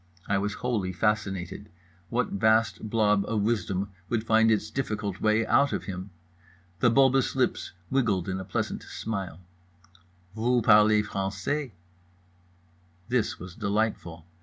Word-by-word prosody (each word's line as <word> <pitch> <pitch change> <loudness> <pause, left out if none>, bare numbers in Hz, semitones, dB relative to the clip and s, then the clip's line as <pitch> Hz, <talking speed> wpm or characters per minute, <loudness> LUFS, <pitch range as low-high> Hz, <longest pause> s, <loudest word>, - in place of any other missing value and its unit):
I 100 -1 +1
was 100 +1 -2
wholly 110 -7 -2
fascinated. 100 -1 -2 0.4
What 120 0 0
vast 110 +1 +1
blob 105 -2 +2
of 110 -3 0
wisdom 100 -3 -1 0.2
would 115 -2 0
find 110 0 +4
its 110 0 +1
difficult 105 -7 -3
way 110 +1 +2
out 140 +4 +3
of - - -2
him? 95 0 -6 0.7
The 120 - +4
bulbous 135 +2 +3
lips 130 -5 -1 0.2
wiggled 110 -10 +1
in 95 0 -2
a - - -5
pleasant - - -3
smile. 95 -6 -5 0.9
"Voo 120 +1 +1
parlez 105 -1 +5
français." 100 +8 -3 1.4
This 125 -3 0
was 90 -1 -9
delightful. 100 -6 -2
105 Hz, 130 wpm, -27 LUFS, 95-115 Hz, 1.4 s, parlez